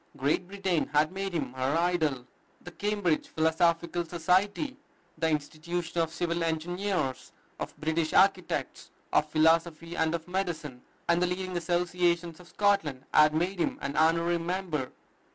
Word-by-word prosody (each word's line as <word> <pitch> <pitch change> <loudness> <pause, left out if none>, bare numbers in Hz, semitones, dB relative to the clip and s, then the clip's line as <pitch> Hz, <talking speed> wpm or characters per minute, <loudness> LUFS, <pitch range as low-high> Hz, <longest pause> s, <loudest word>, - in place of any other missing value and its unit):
Great 145 +6 0
Britain 190 -4 -1
had 150 +2 +3
made 195 +1 -3
him 140 -7 -3
her 130 +4 0
idol. 160 -7 +1 0.4
The 175 - -10
Cambridge 205 -4 0
Philosophical 165 +2 +1
Society, 185 - +1 0.4
the 160 0 0
Institution 160 +3 -2
of 165 -1 -1
Civil 170 0 -1
Engineers, 170 -2 -2 0.3
of - - -6
British 160 +1 -1
Architects, 190 -2 +1 0.2
of 150 - +3
Philosophy 165 +1 +2
and 160 +1 +1
of 165 0 -6
Medicine, 165 -8 -3 0.3
and 170 0 +3
the 180 - +3
leading 185 0 -3
associations 175 -1 0
of 180 - -14
Scotland 160 -11 +1
had 155 0 +6
made 180 +4 0
him - - 0
an 140 - -4
honorary 165 +2 +3
member. 170 -6 -2
170 Hz, 140 wpm, -29 LUFS, 155-180 Hz, 0.4 s, had